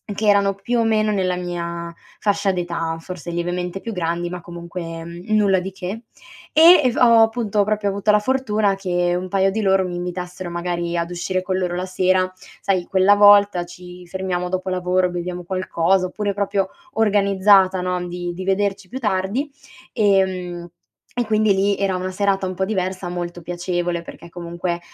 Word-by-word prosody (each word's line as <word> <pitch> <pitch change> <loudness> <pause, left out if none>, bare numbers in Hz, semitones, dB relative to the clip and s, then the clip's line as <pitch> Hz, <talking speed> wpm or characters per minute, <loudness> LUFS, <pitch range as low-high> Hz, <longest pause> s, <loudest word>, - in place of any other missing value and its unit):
che 215 +1 -1
erano 200 -1 +4
più 235 +5 -1
o - - +3
meno 215 -1 +2
nella 185 -2 0
mia 170 -1 -5 0.3
fascia 200 -1 +1
d'età, 170 -2 -3
forse 175 0 -8
lievemente 175 +2 -3
più 225 +3 -6
grandi 175 -1 -2
ma 180 0 -6
comunque 170 -1 -7 0.2
nulla 205 -3 +3
di 190 +2 -5
che; 190 +4 -6 0.5
e 330 +1 +8
e 255 - +3
v - - -8
ho 235 -4 +6
appunto 220 -2 +2
proprio 210 0 -1
avuto 200 +2 +1
la 210 - +4
fortuna 215 -4 +1
che 175 -2 0
un 185 +1 -4
paio 195 0 +2
di 220 +3 -2
loro 190 -2 +2
mi 175 - -5
invitassero 180 0 -5
magari 175 0 -2
ad 170 +1 -2
uscire 185 +1 -2
con 185 0 -1
loro 180 -2 -1
la 180 +1 -2
sera. 185 0 +1 0.3
Sai, 185 -3 0
quella 195 +1 +4
volta 205 -3 +6
ci 180 0 -12
fermiamo 180 0 -3
dopo 185 +1 -2
lavoro, 180 0 +1
beviamo 175 0 -5
qualcosa 185 0 0
oppure 205 +2 -3
proprio 200 -1 0 0.3
organizzata 200 -3 +4
no, 180 0 -2
di 175 0 -5
di 185 +2 -6
vederci 195 0 -1
più 260 - -5
tardi; 210 +5 -1 0.4
ehm, 185 -4 +1 0.4
e 245 -1 -1
quindi 215 -1 +3
lì 200 +1 +2
era 195 -2 0
una 185 +1 -3
serata 195 0 0
un 185 - -3
po' 190 - -1
diversa, 185 -2 -2
molto 175 0 -5
piacevole 175 0 -2
perché 170 - -12
comunque, 170 0 -4
185 Hz, 175 wpm, -21 LUFS, 175-200 Hz, 0.5 s, e